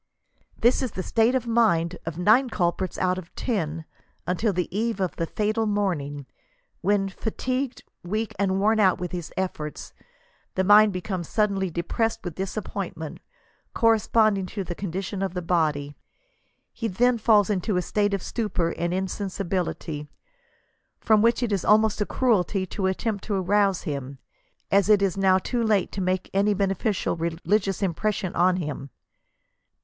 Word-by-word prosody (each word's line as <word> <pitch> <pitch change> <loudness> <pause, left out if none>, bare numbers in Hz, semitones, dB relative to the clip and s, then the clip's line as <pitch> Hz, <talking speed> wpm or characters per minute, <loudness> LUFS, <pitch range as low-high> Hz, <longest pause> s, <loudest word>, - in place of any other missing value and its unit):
This 240 +3 +3
is 255 -5 -3
the 185 - -3
state 230 +5 +2
of 255 -2 0
mind 210 -8 +2
of 165 -1 -4
nine 220 +9 +4
culprits 180 -2 -1
out 185 0 +1
of 175 -2 -12
ten 165 - -2 0.4
until 185 +5 0
the 180 -2 -1
eve 225 -1 -1
of 185 -2 -1
the 165 - -1
fatal 215 +4 0
morning, 155 -9 -1 0.6
when 200 -1 +2
fatigued, 255 +6 -3 0.2
weak, 215 +4 -2
and 190 -1 +1
worn 215 +2 +3
out 190 -3 +4
with 180 -1 -4
his 175 -3 -5
efforts, 155 -5 -4 0.6
the 190 - +2
mind 210 +2 +7
becomes 185 -2 -4
suddenly 200 -3 +1
depressed 175 +7 -1
with 175 -3 -5
disappointment, 190 -4 -5 0.6
corresponding 215 -3 +3
to 200 +1 -4
the 175 - -5
condition 190 +2 -4
of 190 -1 -2
the 180 - -2
body; 150 -4 0 0.8
he 230 - -3
then 235 +4 +2
falls 215 -2 +4
into 190 0 0
a - - +2
state 205 +1 +1
of 195 - -5
stupor 190 -7 -1
and 175 +1 -1
insensibility, 185 -5 -3 0.9
from 215 -1 +4
which 235 +2 +3
it 235 - -1
is 195 -3 0
almost 215 0 +3
a 210 - 0
cruelty 205 -6 +1
to 190 +1 -2
attempt 200 +2 -2
to 200 -3 -1
rouse 195 0 +2
him, 140 -4 -5 0.5
as 200 +1 +3
it 205 -2 +5
is 190 -3 +1
now 190 -1 +4
i^p 235 +5 -1
late 200 -4 +2
to 195 - -4
make 185 0 0
any 200 +1 +2
beneficial 195 +1 0
religious 185 +4 -1
impression 190 +1 -1
on 180 +1 +4
him. 150 -5 -4
195 Hz, 155 wpm, -25 LUFS, 180-215 Hz, 0.9 s, mind